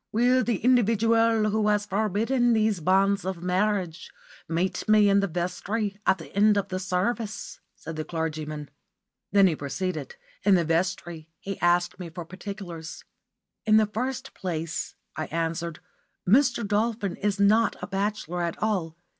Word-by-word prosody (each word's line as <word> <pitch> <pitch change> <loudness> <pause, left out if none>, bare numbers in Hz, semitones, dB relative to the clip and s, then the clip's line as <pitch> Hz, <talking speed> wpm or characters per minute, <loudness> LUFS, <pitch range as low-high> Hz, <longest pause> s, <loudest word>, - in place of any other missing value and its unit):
"Will 250 +3 +3
the 235 -4 0
individual 230 -2 +3
who 215 0 +1
has 210 0 +2
forbidden 220 +5 +1
these 215 -3 +2
banns 195 +4 +2
of 185 -2 -4
marriage 185 -2 0 0.4
meet 175 +5 -1
me 215 -1 +6
in 200 0 +5
the 200 - +1
vestry 190 +4 -2
at 190 - +4
the 165 - -12
end 210 +1 +5
of 200 - -1
the 185 - -2
service?" 200 +4 -2 0.2
said 160 0 -8
the 155 - -2
clergyman. 155 -2 -4 0.6
Then 200 0 +6
he 175 -4 +3
proceeded. 185 - -4 0.3
In 200 - +5
the 170 -2 +2
vestry 165 -1 -1
he 195 -1 -6
asked 175 +1 +2
me 175 -2 -6
for 170 +1 -7
particulars. 185 -3 -8 0.6
"In 215 0 +5
the 220 - +5
first 255 +5 -4
place," 165 -3 -4 0.2
I 155 - -3
answered, 165 0 -3 0.5
"Mr. 235 0 +3
Dolphin 210 -2 0
is 205 -1 -1
not 215 +3 +4
a - - -4
bachelor 195 -2 -2
at 170 -1 -2
all. 180 -7 -1
195 Hz, 155 wpm, -26 LUFS, 175-215 Hz, 0.6 s, me